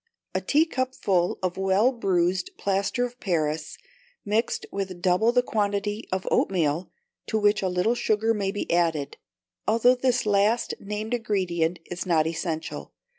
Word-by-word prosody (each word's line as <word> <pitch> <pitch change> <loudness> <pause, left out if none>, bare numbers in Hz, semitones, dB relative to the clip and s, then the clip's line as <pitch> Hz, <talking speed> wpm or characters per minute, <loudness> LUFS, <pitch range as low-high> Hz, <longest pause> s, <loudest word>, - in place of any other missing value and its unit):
A - - 0
teacupful 255 - +1
of 185 0 -1
well 195 +6 +3
bruised 185 -6 0
plaster 200 +5 0
of 245 0 -9
Paris, 155 -4 -1 0.5
mixed 215 +3 0
with 190 -2 -4
double 185 +6 +3
the 250 0 +3
quantity 205 -1 -1
of 190 0 -2
oatmeal, 170 -2 +1 0.4
to 220 - 0
which 210 0 +3
a 190 - 0
little 180 +6 +1
sugar 225 -1 +1
may 200 -3 -1
be 205 -4 -3
added, 160 -5 0 0.5
although 230 +3 +5
this 250 -1 +1
last 210 +3 +2
named 210 +3 -4
ingredient 180 -7 0
is 175 +2 -5
not 160 -3 +3
essential. 160 0 -4
200 Hz, 140 wpm, -26 LUFS, 175-225 Hz, 0.5 s, although